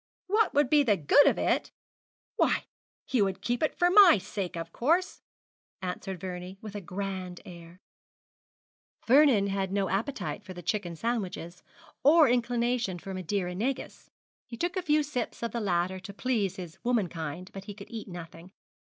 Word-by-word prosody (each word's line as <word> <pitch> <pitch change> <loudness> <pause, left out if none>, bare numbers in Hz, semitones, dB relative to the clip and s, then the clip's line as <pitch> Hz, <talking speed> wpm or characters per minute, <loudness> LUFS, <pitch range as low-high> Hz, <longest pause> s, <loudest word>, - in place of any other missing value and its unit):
'What 425 -1 +2
would 290 -1 +4
be 295 +2 +5
the 220 -8 +3
good 170 - +5
of - - +3
it! - - 0 0.6
Why, - - +2 0.4
he 255 -4 +1
would 195 -1 0
keep 240 +3 -1
it 310 - 0
for 355 0 +3
my 385 - +8
sake, 190 -1 -5
of 165 0 -6
course!' 335 +9 +1 0.6
answered 185 0 -5
Vernie, 180 +1 -6
with 215 -1 -9
a 205 - -5
grand 185 -1 -5
air. 170 0 -12 1.3
Vernon 260 -5 +5
had 195 -1 -1
no 195 -1 0
appetite 215 +2 -2
for 185 -2 -9
the 175 - -9
chicken 185 -6 -2
sandwiches, 185 -4 -3 0.4
or 305 +2 +7
inclination 240 -4 0
for 190 +3 -7
Madeira 185 0 -2
negus. 250 +8 -4 0.4
He 235 - -8
took 350 - -2
a 370 - 0
few 305 -3 +2
sips 250 -5 -4
of 235 - -2
the 235 - -3
latter 185 -1 0
to 195 +2 -9
please 210 -6 0
his 180 -1 -9
womankind, 180 -7 -2
but 195 0 -8
he 205 - -8
could 210 - -12
eat 225 -2 -6
nothing. 175 0 -10
200 Hz, 170 wpm, -29 LUFS, 180-245 Hz, 1.3 s, my